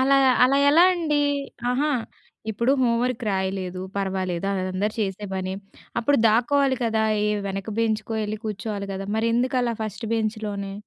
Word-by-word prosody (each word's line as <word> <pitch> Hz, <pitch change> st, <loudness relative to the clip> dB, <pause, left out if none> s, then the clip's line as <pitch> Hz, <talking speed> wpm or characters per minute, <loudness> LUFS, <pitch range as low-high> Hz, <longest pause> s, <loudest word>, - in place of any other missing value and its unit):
అలా 275 Hz, +1 st, +4 dB, 0.3 s
అలా 270 Hz, +2 st, +3 dB
ఎలా 320 Hz, +5 st, +6 dB
అండి? 320 Hz, -4 st, 0 dB, 0.5 s
ఆహా! 280 Hz, +5 st, +1 dB, 0.6 s
ఇప్పుడు 235 Hz, +5 st, +1 dB
హోంవర్క్ 240 Hz, 0 st, +1 dB
రాయలేదు. 190 Hz, -1 st, -2 dB, 0.2 s
పర్వాలేదు. 190 Hz, -2 st, -2 dB
అదందరూ 185 Hz, +2 st, -1 dB
చేసే 205 Hz, 0 st, -2 dB
పనే. 185 Hz, 0 st, -3 dB, 0.5 s
అప్పుడు 280 Hz, +5 st, +2 dB
దాక్కోవాలి 260 Hz, +4 st, +2 dB
కదా! 220 Hz, -1 st, +1 dB, 0.2 s
ఏ -, -, +1 dB, 0.2 s
వెనక 195 Hz, +2 st, -4 dB
బెంచ్‌కో 220 Hz, 0 st, -1 dB
ఎళ్ళి 215 Hz, 0 st, -4 dB
కూర్చోవాలి 210 Hz, -1 st, -4 dB
గదా! 195 Hz, +1 st, -5 dB
మరెందుకు 235 Hz, +3 st, +1 dB
అలా 235 Hz, -1 st, 0 dB
ఫస్ట్ 215 Hz, +1 st, -5 dB
బెంచ్‌లోనే? 215 Hz, -3 st, -3 dB
215 Hz, 140 wpm, -24 LUFS, 195-245 Hz, 0.6 s, ఎలా